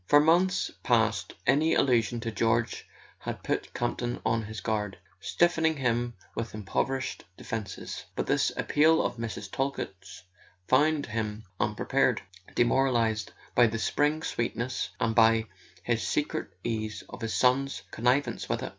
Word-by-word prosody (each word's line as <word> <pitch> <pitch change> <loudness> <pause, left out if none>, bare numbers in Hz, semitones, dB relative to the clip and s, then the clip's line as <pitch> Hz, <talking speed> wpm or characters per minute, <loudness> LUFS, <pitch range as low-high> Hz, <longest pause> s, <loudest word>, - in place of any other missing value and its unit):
For 145 - +7
months 175 +5 +3
past 110 -6 +1
any 155 +5 +3
allusion 120 -3 +2
to 115 -1 -3
George 115 +1 0 0.3
had - - -6
put - - -2
Campton 120 0 -2
on 115 +1 +2
his 110 0 -6
guard, 105 -2 -2 0.2
stiffening 160 - +2
him 120 -2 0 0.2
with 115 -1 -4
improvised 130 +6 -2
defences. 105 -5 -5
But - - -1
this - - +2
appeal 160 +2 +4
of - - -2
Mrs. 110 -3 -5
Talkett's 135 -11 -4 0.4
found 145 +2 +3
him 110 -1 -3 0.2
unprepared, 130 +2 +1 0.4
demoralized 120 -4 +2 0.2
by 120 -1 +6
the 115 +1 -2
spring 150 +7 +1
sweetness, 120 +2 -2
and 115 -2 +1
by 115 -1 +5 0.4
his 115 +1 0
secret 100 +9 -1 0.2
sense 110 -2 -3
of - - -10
his 115 -1 -2
son's 135 +2 +2
connivance 125 +5 +1
with - - -1
it. - - -3
120 Hz, 135 wpm, -28 LUFS, 110-135 Hz, 0.4 s, For